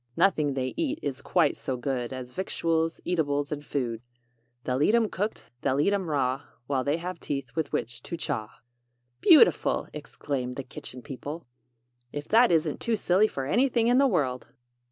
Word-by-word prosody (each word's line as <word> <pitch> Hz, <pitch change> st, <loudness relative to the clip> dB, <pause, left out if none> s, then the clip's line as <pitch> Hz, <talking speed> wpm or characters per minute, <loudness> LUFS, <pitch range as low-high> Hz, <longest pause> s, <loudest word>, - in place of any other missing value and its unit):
Nothing 150 Hz, -8 st, +3 dB
they 130 Hz, -1 st, -2 dB
eat 300 Hz, -2 st, 0 dB
is 135 Hz, -3 st, -3 dB
quite -, -, +2 dB
so 130 Hz, -, -4 dB
good 125 Hz, -1 st, -2 dB
As 130 Hz, -1 st, -6 dB
victuals, 165 Hz, -1 st, -1 dB
eatables 145 Hz, -4 st, 0 dB
and 145 Hz, -1 st, -4 dB
food. 120 Hz, -6 st, -2 dB, 0.6 s
They'll 130 Hz, +1 st, -1 dB
eat 210 Hz, +9 st, +4 dB
'em 225 Hz, -3 st, +3 dB
cooked, 205 Hz, -, -4 dB
they'll 135 Hz, 0 st, +1 dB
eat 200 Hz, +7 st, +3 dB
'em 190 Hz, -4 st, -1 dB
raw, 135 Hz, -2 st, 0 dB, 0.2 s
While 130 Hz, -1 st, 0 dB
they 145 Hz, +4 st, +1 dB
have 175 Hz, 0 st, -5 dB
teeth 135 Hz, -5 st, -4 dB
with 160 Hz, -3 st, -1 dB
which 120 Hz, +1 st, -3 dB
to 170 Hz, -, -6 dB
chaw.'" 110 Hz, -9 st, -4 dB, 0.6 s
"Beautiful!" 335 Hz, -, +5 dB
exclaimed 140 Hz, -4 st, -4 dB
the 135 Hz, -, -4 dB
Kitchen 125 Hz, -1 st, -8 dB
People. 145 Hz, +6 st, -7 dB, 0.7 s
"If 145 Hz, 0 st, -5 dB
that 235 Hz, 0 st, +6 dB
isn't 160 Hz, -2 st, +1 dB
too 235 Hz, -, 0 dB
silly 200 Hz, +1 st, +3 dB
for 135 Hz, -9 st, -4 dB
anything 235 Hz, -, +2 dB
in 250 Hz, +2 st, +5 dB
the 275 Hz, -, +5 dB
world!" 135 Hz, -, 0 dB
145 Hz, 175 wpm, -27 LUFS, 130-185 Hz, 0.7 s, that